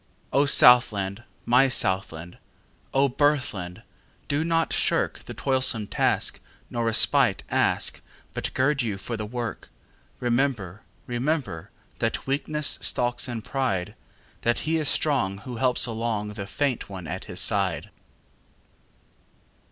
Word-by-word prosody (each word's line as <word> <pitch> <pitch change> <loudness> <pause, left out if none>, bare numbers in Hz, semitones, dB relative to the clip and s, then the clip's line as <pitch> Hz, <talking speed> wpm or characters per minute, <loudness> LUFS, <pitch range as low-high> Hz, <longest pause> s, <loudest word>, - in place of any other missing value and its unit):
O 140 +2 +4
Southland! 110 -7 +5 0.2
my 125 +3 +5
Southland!O 95 - -1
birthland! 130 -10 0 0.4
do 145 +2 0
not 165 0 +1
shirkThe - - -1
toilsome 130 -5 +1
task, - - 0 0.3
nor 120 -1 -1
respite 115 -1 +3
ask, - - +1 0.3
But - - -4
gird 140 +2 +2
you 110 -5 -2
for 115 +4 -5
the 105 -1 -4
work. 115 - -5 0.5
Remember, 120 -6 -1 0.3
rememberThat 120 - -3
weakness 150 +2 0
stalks 120 +1 +1
in 115 -3 -5
pride; 105 -8 -2 0.5
That 120 0 +1
he 160 +1 +1
is 150 -2 0
strong 130 -11 0
who 120 +4 -8
helps 125 0 +3
alongThe 110 -3 -3
faint 135 -4 -1
one 95 -3 -7
at 80 - -5
his - - -6
side. - - +1
120 Hz, 115 wpm, -25 LUFS, 105-135 Hz, 0.5 s, Southland